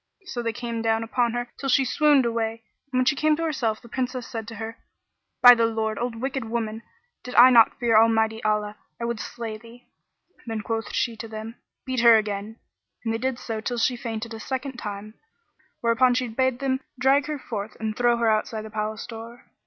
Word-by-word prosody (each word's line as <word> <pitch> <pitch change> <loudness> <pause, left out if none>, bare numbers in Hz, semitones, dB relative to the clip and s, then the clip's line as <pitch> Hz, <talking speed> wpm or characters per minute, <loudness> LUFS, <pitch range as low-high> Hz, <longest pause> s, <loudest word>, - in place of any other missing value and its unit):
So 245 -9 -4
they 230 -1 -1
came 235 0 -4
down 225 0 +1
upon 235 +1 0
her 240 0 -3
till 275 - -3
she 270 +1 +4
swooned 290 0 +4
away; 230 -1 -2 0.3
and, 255 - -1
when - - +1
she 285 - +3
came 305 +2 +2
to 330 - -3
herself, 265 -9 -1
the - - -12
Princess 255 0 -3
said 225 -1 -6
to 230 - -8
her, 225 +1 -7 0.6
"By 245 0 +12
the 230 -1 +2
Lord! 220 -1 -2
O 245 - 0
wicked 260 +3 -3
old 225 -1 -8
woman, 225 -1 -2 0.4
did 250 - -7
I 250 +2 +9
not 230 -2 +6
fear 235 -3 +2
Almighty 225 0 +2
Allah, 210 -1 0 0.2
I 235 - -2
would 235 -2 -2
slay 225 -2 -6
thee." 235 +2 -16 0.6
Then 225 -1 -3
quoth 225 -1 -3
she 235 - -1
to 225 - -7
them, 220 +1 -8 0.3
"Beat 260 -1 -1
her 235 -1 +8
again" 210 0 -3 0.5
and 225 - 0
they 225 - -2
did 260 0 -1
so 225 -3 -5
till 240 +2 -3
she 245 +2 +2
fainted 230 -1 -5
a 225 - -7
second 265 +2 -4
time, 210 -1 -6 0.7
whereupon 245 +2 +3
she 250 0 0
bade 260 +2 0
them 265 0 -1 0.2
drag 270 +3 +3
her 305 -1 -3
forth 215 -5 -6
and 220 -1 -3
throw 240 0 +3
her 235 -1 +1
outside 215 0 0
the 215 - -9
palace 215 0 -3
door. 230 +1 -10
230 Hz, 215 wpm, -25 LUFS, 220-250 Hz, 0.7 s, By